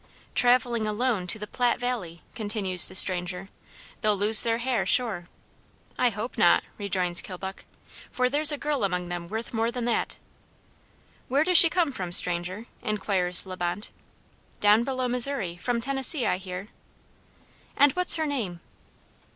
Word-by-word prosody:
"Traveling 245 -2 0
alone 215 -3 -2
to 180 - -4
the 210 - -8
Platte 245 +3 -2
valley," 205 -10 -6
continues 205 -5 +4
the - - -9
stranger, 180 0 +2 0.5
"they'll 210 -3 0
lose 210 +2 +6
their 230 -1 -1
hair, 245 0 -2
sure." 205 -9 -1 0.7
"I 250 - +2
hope 220 +2 -7
not," 175 - +3 0.2
rejoins 185 -4 0
Kilbuck, 190 +1 -10 0.4
"for 250 0 -1
there's 295 +3 +5
a 295 - -4
girl 290 -4 -3
among 180 -2 -3
them 175 -1 -7
worth 220 +6 -7
more 225 0 -1
than 240 0 -5
that." 240 - -3 1.1
"Where 275 +4 0
does 360 0 +7
she 335 - +8
come 340 -4 -1
from, 180 -8 -7
stranger," 180 +4 +4 0.2
inquires 190 -4 -1
La 185 -1 -8
Bonte. 175 +3 -5 0.7
"Down 210 +2 +3
below 260 -1 -3
Missouri, 245 -7 +2
from 235 +6 -4
Tennessee, 270 +1 0
I - - -1
hear." 185 +2 -9 1.1
"And 285 0 +4
what's 360 +2 +2
her 320 -1 -3
name?" 225 - -5
215 Hz, 150 wpm, -24 LUFS, 185-250 Hz, 1.1 s, she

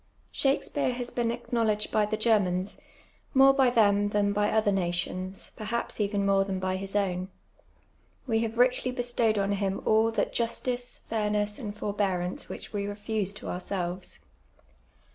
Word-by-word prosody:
Shakspeare 275 -1 0
has 245 0 -4
been 235 -1 0
acknowledged 230 -3 0
by 210 -1 +2
the 215 +1 -1
Germans, 200 -4 +1 0.6
more 270 +1 +7
by 265 -2 +4
them 205 -4 +3
than 205 -1 +1
by 210 0 +2
other 215 -1 +2
nations, 185 +1 -2
perhaps 220 +1 -3
even 200 -1 0
more 195 0 +4
than 195 -1 -3
by 185 0 -1
his 195 +1 -6
own. 185 -3 0 1.0
We 225 -4 +1
have 225 0 -2
richly 250 +1 +3
bestowed 240 -3 +1
on 200 0 +1
him 195 -1 -1
all 220 +1 +4
that - - 0
justice, 245 +1 -1
fairness, 210 -1 -1
and 210 -5 -5
forbearance 195 -4 -1
which - - -8
we 200 -1 -2
refuse 205 -1 -2
to - - -9
ourselves. 180 0 -4
210 Hz, 150 wpm, -28 LUFS, 195-230 Hz, 1.0 s, more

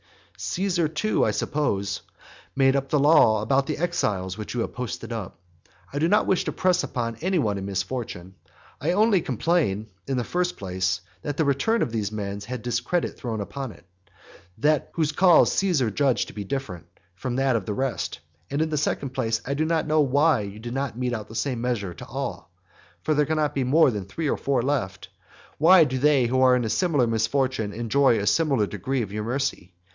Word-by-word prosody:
Caesar 180 -3 -1
too, 160 +8 0
I - - +3
suppose, 100 - -1 0.5
made 135 -1 +4
the 140 +2 0
law 140 -8 +5
about 135 +4 +1
the 155 - -2
exiles 105 - -1
which 105 +2 -6
you 120 - 0
have - - -3
posted 125 -1 -5
up. 110 -6 -6 0.5
I 145 - -1
do 160 - +2
not 210 +4 +3
wish 190 - +1
to - - -1
press 185 -1 +2
upon 115 -4 -3
any 185 +7 0
one 105 -9 0
in 95 - -5
misfortune; 95 -2 -4 0.5
I 165 +4 +1
only 205 -1 +4
complain, 125 - 0 0.2
in 135 - -1
the 120 - 0
first 180 +6 -1
place, 95 -2 -1 0.2
that 145 -1 -4
the 160 - +2
return 140 - +2
of - - -3
those 105 -3 -2
men 100 -2 -4
has 100 - -9
had 125 0 -6
discredit 120 +8 -1
thrown 115 -4 -4
upon 130 +5 -5
it, - - -20 1.1
whose 155 -2 0
cause 175 +2 +5
Caesar 160 - +1
judged 135 +2 +1
to - - -11
be 105 - -5
different 100 - -5 0.3
from 120 +7 -4
that 135 -1 +2
of 110 -5 -2
the 105 - -2
rest; 130 -1 -2 0.3
and 145 +3 0
in 160 - -3
the 150 - 0
second 140 -2 -1
place, 115 -4 -1
I 140 - -1
do 155 +3 0
not 165 0 +1
know 155 0 +3
why 145 +2 +3
you 100 0 -7
do 120 +2 -7
not 135 -2 -3
mete 125 -1 -1
out 110 -3 -4
the 110 - -11
same 125 0 -1
measure 115 -7 -2
to - - -11
all. - - -5 0.5
For 155 - +1
there 150 -1 +2
can 155 0 0
not 150 -1 +1
be 135 - 0
more 140 +2 +4
than 105 -4 -4
three 155 - -4
or - - 0
four 135 -4 0
left. 120 -9 -2 0.5
Why 170 +3 +7
do 130 -3 -1
not - - -4
they 145 -3 +4
who 130 +2 +1
are 130 -1 +6
in 120 -2 0
similar 150 - +2
misfortune 115 0 0
enjoy 120 +3 +2
a 100 - -1
similar 135 +1 +2
degree 115 +6 -2
of 100 - -7
your 105 +1 -3
mercy? 120 -8 -3
130 Hz, 210 wpm, -25 LUFS, 110-150 Hz, 1.1 s, Why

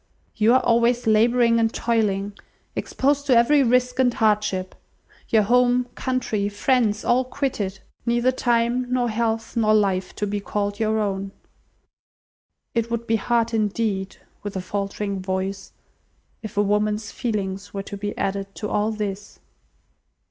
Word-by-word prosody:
You 225 +3 +4
are 260 - +4
always 235 +1 +2
labouring 230 +2 +4
and 225 -1 +2
toiling, 205 -4 0 0.4
exposed 285 +1 0
to 255 -4 +5
every 280 +5 +5
risk 250 0 +2
and 255 -1 +4
hardship. 210 -4 0 0.6
Your 220 -2 +4
home, 245 +2 +3
country, 230 -6 -1
friends, 215 0 +1
all 250 +2 +3
quitted. 250 -7 -3 0.3
Neither 240 +2 +2
time, 240 0 +1
nor 245 -2 +1
health, 225 0 -2
nor 215 -2 +3
life, 190 -3 +1
to 210 - -2
be 205 0 -2
called 205 0 -3
your 220 0 +1
own. 195 -2 -2 1.4
It 230 -1 0
would 235 0 -2
be 225 -1 +2
hard, 230 +2 0
indeed" 210 -3 -1 0.3
(with 205 -1 -6
a 190 - -2
faltering 200 +1 -3
voice), 190 +1 -3 0.7
"if 215 -2 -8
woman's 210 +1 +1
feelings 200 -4 -3
were 195 -1 -4
to 200 - -7
be 205 +1 -5
added 195 0 -3
to 210 - -4
all 210 +1 +1
this." 205 -2 -5
220 Hz, 140 wpm, -23 LUFS, 200-240 Hz, 1.4 s, to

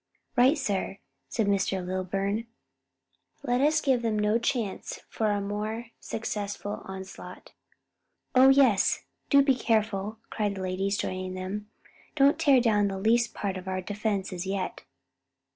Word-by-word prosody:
'" - - -48
"Right, 265 +5 +5
sir," 200 -7 -2 0.3
said 225 - 0
Mr. 195 -2 0
Lilburn, 195 +4 -2 1.0
"let 245 -1 +1
us 305 +2 +4
give 260 -4 +2
them 225 -2 0
no 210 +2 +2
chance 230 -4 -2
for 220 -1 0
a 205 -1 +1
more 215 +3 -4
successful 205 -1 -4
onslaught." 190 0 -9 0.8
"Oh, 260 +1 +7
yes, 265 -7 +4 0.3
do 280 -1 +6
be 270 -1 +4
careful!" 215 -3 0
cried 205 -2 -1
the 190 - -5
ladies, 195 +2 -1
joining 185 -1 -3
them, 195 +3 -5 0.5
"don't 280 0 +4
tear 275 -3 +5
down 210 -4 +3
the 195 -1 -3
least 230 +4 +2
part 195 -2 -2
of 185 0 -9
our 185 0 -1
defences 195 -2 -3
yet." 195 -1 -3
210 Hz, 145 wpm, -28 LUFS, 195-235 Hz, 1.0 s, Oh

